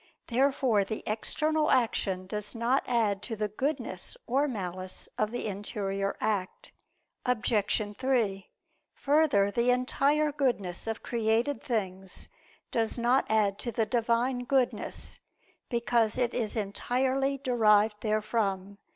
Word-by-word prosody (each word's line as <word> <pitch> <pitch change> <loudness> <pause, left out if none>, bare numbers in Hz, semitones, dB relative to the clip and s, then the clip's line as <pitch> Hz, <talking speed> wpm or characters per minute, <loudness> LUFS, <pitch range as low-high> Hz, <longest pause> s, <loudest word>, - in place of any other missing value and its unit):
Therefore 260 -4 +2
the 215 +3 -5
external 305 +8 0
action 200 -7 +1
does 210 +3 -4
not 235 +4 +1
add 220 -5 +1
to 225 +1 -4
the 210 0 -2
goodness 245 - -3
or 275 +4 +2
malice 185 -6 -5
of 215 - 0
the 245 - -4
interior 200 -1 -3
act. 210 - -2 0.5
Obj. 250 -1 0 0.5
3: 230 -8 0 0.5
Further, 280 -9 +3
the 235 +4 +1
entire 280 +4 +2
goodness 235 -11 -1
of 225 0 -3
created 230 +4 0
things 190 -5 -3 0.4
does 225 0 0
not 240 +3 +2
add 210 -2 +2
to 235 - -3
the 225 0 +1
Divine 240 +2 +1
Goodness, 260 -1 0 0.5
because 235 -2 +1
it 245 -2 +1
is 225 -1 -1
entirely 260 +6 0
derived 215 -5 +3
therefrom. 210 -3 -1
230 Hz, 120 wpm, -29 LUFS, 205-255 Hz, 0.5 s, Further